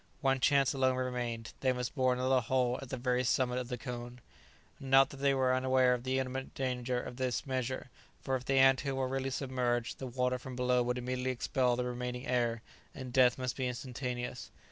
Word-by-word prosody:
One 135 Hz, -2 st, +2 dB
chance 140 Hz, +1 st, +3 dB
alone 130 Hz, -1 st, +2 dB
remained. 125 Hz, -3 st, -3 dB
They 130 Hz, -, +2 dB
must 125 Hz, -1 st, -3 dB
bore 130 Hz, -3 st, +2 dB
another 130 Hz, +1 st, +2 dB
hole 125 Hz, 0 st, +1 dB
at 135 Hz, -, -9 dB
the 130 Hz, -, -3 dB
very 125 Hz, 0 st, +1 dB
summit 125 Hz, 0 st, +1 dB
of 125 Hz, -, -4 dB
the 125 Hz, 0 st, -4 dB
cone. 120 Hz, 0 st, -7 dB, 0.6 s
Not 135 Hz, 0 st, +4 dB
that 140 Hz, -, -9 dB
they 140 Hz, 0 st, +2 dB
were 130 Hz, -1 st, +2 dB
unaware 130 Hz, 0 st, +3 dB
of 125 Hz, 0 st, -4 dB
the 130 Hz, 0 st, 0 dB
imminent 130 Hz, 0 st, -3 dB
danger 125 Hz, -1 st, -1 dB
of 125 Hz, -, -7 dB
this 130 Hz, -2 st, -1 dB
measure, 130 Hz, -1 st, -3 dB, 0.3 s
for 135 Hz, -, -1 dB
if 130 Hz, -, -3 dB
the 135 Hz, 0 st, +1 dB
ant 135 Hz, 0 st, +6 dB
hill 140 Hz, -1 st, -2 dB
were 130 Hz, -1 st, 0 dB
really 135 Hz, 0 st, -2 dB
submerged 125 Hz, -3 st, -1 dB
the 130 Hz, -, -4 dB
water 125 Hz, 0 st, 0 dB
from 130 Hz, 0 st, -8 dB
below 125 Hz, 0 st, +2 dB
would 125 Hz, +1 st, -1 dB
immediately 125 Hz, +1 st, -2 dB
expel 125 Hz, 0 st, +1 dB
the 125 Hz, 0 st, -2 dB
remaining 125 Hz, 0 st, -4 dB
air 120 Hz, -2 st, 0 dB, 0.3 s
and 130 Hz, -3 st, -7 dB
death 125 Hz, -1 st, +5 dB
must 130 Hz, -1 st, -2 dB
be 130 Hz, -2 st, -1 dB
instantaneous. 125 Hz, 0 st, -4 dB
125 Hz, 210 wpm, -32 LUFS, 125-130 Hz, 0.6 s, ant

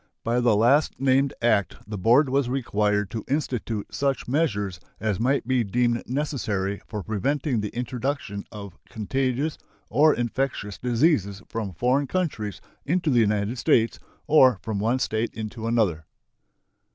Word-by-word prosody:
By 120 Hz, +2 st, +1 dB
the 120 Hz, -3 st, +3 dB
last 130 Hz, +8 st, +3 dB
named 135 Hz, +1 st, +3 dB
act 105 Hz, -5 st, +2 dB
the 105 Hz, -, -6 dB
board 120 Hz, +9 st, +4 dB
was 135 Hz, -1 st, +1 dB
required 105 Hz, -6 st, 0 dB
to 110 Hz, -2 st, -4 dB
institute 125 Hz, -7 st, -2 dB
such 140 Hz, -2 st, -1 dB
measures 105 Hz, -, 0 dB, 0.2 s
as 105 Hz, -2 st, -1 dB
might 130 Hz, +1 st, +1 dB
be 130 Hz, -2 st, +2 dB
deemed 120 Hz, +3 st, +1 dB
necessary 110 Hz, -8 st, -2 dB
for 105 Hz, -3 st, -5 dB
preventing 125 Hz, -, -1 dB
the 105 Hz, -, -3 dB
introduction 125 Hz, -3 st, -3 dB
of 100 Hz, -3 st, -9 dB
contagious 130 Hz, +6 st, -1 dB, 0.3 s
or 155 Hz, +2 st, +5 dB
infectious 120 Hz, -4 st, -2 dB
diseases 115 Hz, -, +1 dB
from 110 Hz, -4 st, -4 dB
foreign 125 Hz, -, +1 dB
countries 140 Hz, -, -2 dB, 0.2 s
into 170 Hz, 0 st, 0 dB
the 120 Hz, -, +4 dB
United 105 Hz, +2 st, +1 dB
States 115 Hz, -1 st, +2 dB, 0.3 s
or 130 Hz, -7 st, +6 dB
from 110 Hz, -3 st, -2 dB
one 115 Hz, +5 st, +1 dB
State 115 Hz, -2 st, -1 dB
into 110 Hz, +1 st, -5 dB
another. 95 Hz, -10 st, +1 dB
120 Hz, 140 wpm, -25 LUFS, 105-135 Hz, 0.3 s, or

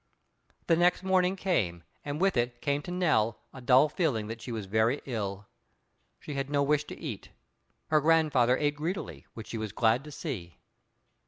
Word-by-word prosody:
The 165 Hz, -, +4 dB
next 175 Hz, +2 st, +3 dB
morning 185 Hz, 0 st, +2 dB
came, 100 Hz, -, -1 dB, 0.2 s
and 145 Hz, +1 st, -4 dB
with 195 Hz, +1 st, +2 dB
it 120 Hz, 0 st, 0 dB
came 140 Hz, +2 st, 0 dB
to 175 Hz, -, -7 dB
Nell 155 Hz, -12 st, +2 dB, 0.2 s
a 130 Hz, -, -10 dB
dull 130 Hz, +3 st, +5 dB
feeling 145 Hz, -, 0 dB
that 115 Hz, 0 st, -6 dB
she 125 Hz, -, -6 dB
was 110 Hz, -3 st, -4 dB
very 110 Hz, +7 st, +1 dB
ill. 100 Hz, -5 st, -4 dB, 0.7 s
She 150 Hz, -, -7 dB
had 135 Hz, 0 st, -3 dB
no 145 Hz, -1 st, +2 dB
wish 150 Hz, +1 st, +1 dB
to -, -, -9 dB
eat. 120 Hz, -, -6 dB, 0.6 s
Her 155 Hz, -1 st, +4 dB
grandfather 150 Hz, -6 st, +4 dB
ate 145 Hz, 0 st, 0 dB
greedily, 170 Hz, +6 st, -4 dB
which 110 Hz, -, -7 dB
she 115 Hz, -, -4 dB
was 110 Hz, -2 st, -4 dB
glad 115 Hz, +4 st, +2 dB
to 150 Hz, -, -9 dB
see. 115 Hz, -, -6 dB
140 Hz, 180 wpm, -29 LUFS, 115-155 Hz, 0.7 s, dull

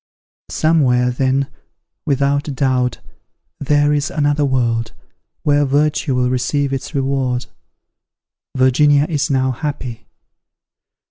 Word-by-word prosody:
"Somewhere, 130 Hz, -6 st, +2 dB
then, 135 Hz, +2 st, 0 dB, 0.6 s
without 140 Hz, +1 st, +1 dB
doubt, 125 Hz, -2 st, 0 dB, 0.6 s
there 145 Hz, +1 st, +2 dB
is 145 Hz, 0 st, 0 dB
another 145 Hz, -1 st, 0 dB
world, 115 Hz, -4 st, 0 dB, 0.5 s
where 145 Hz, 0 st, +3 dB
virtue 145 Hz, 0 st, +1 dB
will 125 Hz, 0 st, +1 dB
receive 140 Hz, +2 st, -1 dB
its 135 Hz, +3 st, -5 dB
reward. 135 Hz, -2 st, -1 dB, 1.1 s
Virginia 140 Hz, +3 st, +4 dB
is 150 Hz, -1 st, -1 dB
now 130 Hz, -1 st, +1 dB
happy. 125 Hz, -5 st, -5 dB
135 Hz, 95 wpm, -18 LUFS, 125-145 Hz, 1.1 s, Virginia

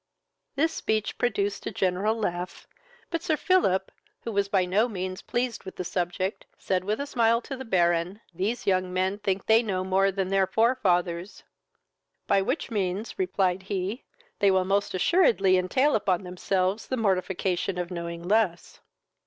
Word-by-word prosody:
This 320 Hz, +4 st, +1 dB
speech 215 Hz, -1 st, -2 dB
produced 205 Hz, -5 st, -1 dB
a -, -, -2 dB
general 190 Hz, +4 st, 0 dB
laugh, 180 Hz, -4 st, -4 dB, 0.5 s
but 335 Hz, -1 st, -1 dB
Sir 315 Hz, -2 st, 0 dB
Philip, 190 Hz, -, +2 dB, 0.3 s
who 230 Hz, -, -5 dB
was 200 Hz, -1 st, +1 dB
by 190 Hz, -2 st, +2 dB
no 200 Hz, +6 st, +2 dB
means 185 Hz, -4 st, -4 dB
pleased 245 Hz, 0 st, -2 dB
with 190 Hz, -, -9 dB
the -, -, -4 dB
subject, 180 Hz, +2 st, -2 dB
said 185 Hz, -1 st, -1 dB
with 210 Hz, +3 st, -1 dB
a 280 Hz, -, -2 dB
smile 230 Hz, -4 st, +2 dB
to 275 Hz, -, -6 dB
the 265 Hz, 0 st, -8 dB
Baron, 175 Hz, -1 st, +1 dB
"These 210 Hz, +8 st, -2 dB
young 185 Hz, -2 st, +1 dB
men 190 Hz, +2 st, 0 dB
think 195 Hz, -2 st, -1 dB
they 225 Hz, +1 st, +5 dB
know 190 Hz, -5 st, -2 dB
more 190 Hz, +1 st, +2 dB
than 190 Hz, -1 st, -2 dB
their 195 Hz, -1 st, +2 dB
forefathers." 185 Hz, -5 st, +1 dB, 0.8 s
"By 195 Hz, -1 st, +3 dB
which 255 Hz, +6 st, -2 dB
means, 200 Hz, -, -2 dB
(replied 190 Hz, -, +1 dB
he,) 195 Hz, +4 st, -3 dB, 0.4 s
they 200 Hz, -, +4 dB
will 190 Hz, -1 st, +3 dB
most 200 Hz, 0 st, 0 dB
assuredly 195 Hz, -, +4 dB
entail 255 Hz, +11 st, +2 dB
upon 195 Hz, -3 st, +1 dB
themselves 185 Hz, +2 st, -1 dB
the 260 Hz, -, -2 dB
mortification 190 Hz, -3 st, 0 dB
of 180 Hz, 0 st, -3 dB
knowing 170 Hz, -1 st, -5 dB
less." 190 Hz, -3 st, 0 dB
195 Hz, 160 wpm, -27 LUFS, 185-220 Hz, 0.8 s, they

